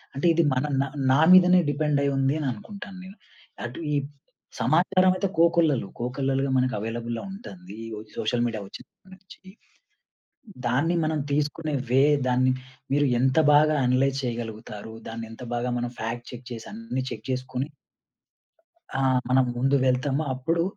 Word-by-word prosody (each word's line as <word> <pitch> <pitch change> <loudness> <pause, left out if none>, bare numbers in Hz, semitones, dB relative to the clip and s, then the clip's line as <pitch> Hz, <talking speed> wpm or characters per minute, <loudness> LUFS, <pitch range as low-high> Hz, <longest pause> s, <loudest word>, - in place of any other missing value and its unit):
అంటే 140 - -2
ఇది 170 +1 +3
మన 130 +2 0 0.2
నా, 140 - -1 0.2
నా 135 - +4
మీదనే 180 0 +8
డిపెండ్ 150 0 +1
అయ్యి 140 0 +1
ఉంది 135 +1 +2
అని 145 - -2
అనుకుంటాను 195 - -9
నేను. 190 +3 -12 0.5
అటు 120 +6 -7
ఈ - - +2 0.7
సమాచారం 185 +6 +4
అయితే 195 - 0
కోకొల్లలు. 165 - +3
కోకొల్లలుగా 135 +2 -1
మనకు 130 0 +1
అవైలబుల్‌లో 115 +1 -4
ఉంటంది. 185 - -10
ఈ - - -8 0.3
సోషల్ 120 +2 0
మీడియా 110 -3 -4
వచ్చినప్పటి 190 - -14
నుంచి. 190 -1 -17 1.3
దాన్ని 155 +7 +2
మనం 155 0 0
తీసుకునే 150 +1 -1 0.2
వే, 135 +2 +5 0.3
దాన్ని 130 +1 +3 0.4
మీరు 145 0 +3
ఎంత 130 +4 +3 0.2
బాగా 155 +1 +5
అనలైజ్ 130 +2 +2
చేయగలుగుతారు? 110 -2 -5 0.2
దాన్ని 115 0 -6
ఎంత 115 - -11
బాగా 120 +1 -1
మనం 120 0 -2
ఫ్యాక్ట్ 115 +2 -4
చెక్ 125 0 -10
చేసి 115 -1 -8
అన్ని 215 - -4
చెక్ 110 0 -7
జేసుకొని 130 +2 -3 1.3
ఆ! - - 0 0.3
మనం 130 +1 +4
ముందు 135 +3 +2
వెళ్తాము. 135 +3 +1
అప్పుడు, 165 +6 0
135 Hz, 145 wpm, -25 LUFS, 120-155 Hz, 1.3 s, మీదనే